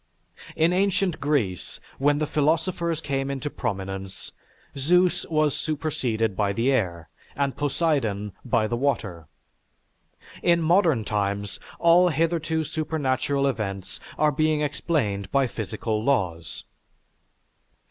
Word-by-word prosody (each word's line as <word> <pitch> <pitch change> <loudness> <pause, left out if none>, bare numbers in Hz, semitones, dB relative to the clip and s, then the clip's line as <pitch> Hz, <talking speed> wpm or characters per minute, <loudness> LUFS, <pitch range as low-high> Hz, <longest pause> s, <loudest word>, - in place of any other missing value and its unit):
In 165 +2 +3
ancient 185 -2 +1
Greece, 130 - -1 0.2
when 145 +2 +3
the 155 - 0
philosophers 165 +3 0
came 135 -2 -2
into 140 +1 -3
prominence, 95 -4 -4 0.4
Zeus 175 +6 +2
was 155 -3 +2
superseded 125 -9 -1
by 100 -1 +1
the 115 +6 +1
air, 85 - -1 0.3
and 140 -1 0
Poseidon 135 -9 0
by 115 -3 +1
the 120 - -1
water; 110 - -2 1.1
in 170 -1 +4
modern 165 - +3
times, 100 -1 -2 0.2
all 175 +1 +5
hitherto 160 0 0
supernatural 140 -3 -1
events 100 -7 -3 0.2
are 150 0 +3
being 155 +1 +1
explained 125 - -1
by 140 -1 +3
physical 110 -1 -3
laws. 90 - -1
140 Hz, 110 wpm, -25 LUFS, 105-155 Hz, 1.1 s, all